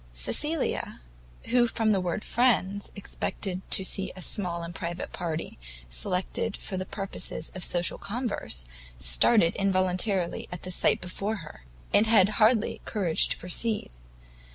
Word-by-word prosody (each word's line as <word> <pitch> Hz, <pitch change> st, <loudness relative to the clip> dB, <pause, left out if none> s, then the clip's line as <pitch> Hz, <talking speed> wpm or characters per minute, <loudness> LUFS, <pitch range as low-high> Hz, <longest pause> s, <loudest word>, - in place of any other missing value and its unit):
Cecilia, 295 Hz, -, 0 dB, 0.5 s
who 240 Hz, 0 st, +5 dB
from 225 Hz, -1 st, +1 dB
the 195 Hz, -3 st, +2 dB
word 180 Hz, +3 st, -2 dB
friends, 205 Hz, -5 st, +1 dB
expected 190 Hz, -1 st, -4 dB
to 190 Hz, -, +3 dB
have -, -, +2 dB
seen 195 Hz, -1 st, -3 dB
a 185 Hz, -, -9 dB
small 175 Hz, -4 st, -2 dB
and 170 Hz, +1 st, -6 dB
private 170 Hz, +1 st, -5 dB
party, 165 Hz, -, -4 dB, 0.3 s
selected 180 Hz, -, -2 dB
for 195 Hz, -, -6 dB
the 185 Hz, 0 st, -3 dB
purpose 195 Hz, -2 st, -5 dB
of 180 Hz, +3 st, -4 dB
social 175 Hz, -1 st, -1 dB
converse, 210 Hz, -, -2 dB, 0.3 s
started 165 Hz, -, +5 dB
involuntarily 185 Hz, -1 st, +1 dB
at 180 Hz, -, -6 dB
the 185 Hz, -, -4 dB
sight -, -, +2 dB
before 195 Hz, +4 st, -2 dB
her, 65 Hz, -, -13 dB, 0.3 s
and 215 Hz, -, +5 dB
had 210 Hz, -4 st, +6 dB
hardly 220 Hz, 0 st, +3 dB
courage 180 Hz, -7 st, +2 dB
to -, -, -1 dB
proceed. 210 Hz, -, -1 dB
185 Hz, 145 wpm, -28 LUFS, 175-215 Hz, 0.5 s, had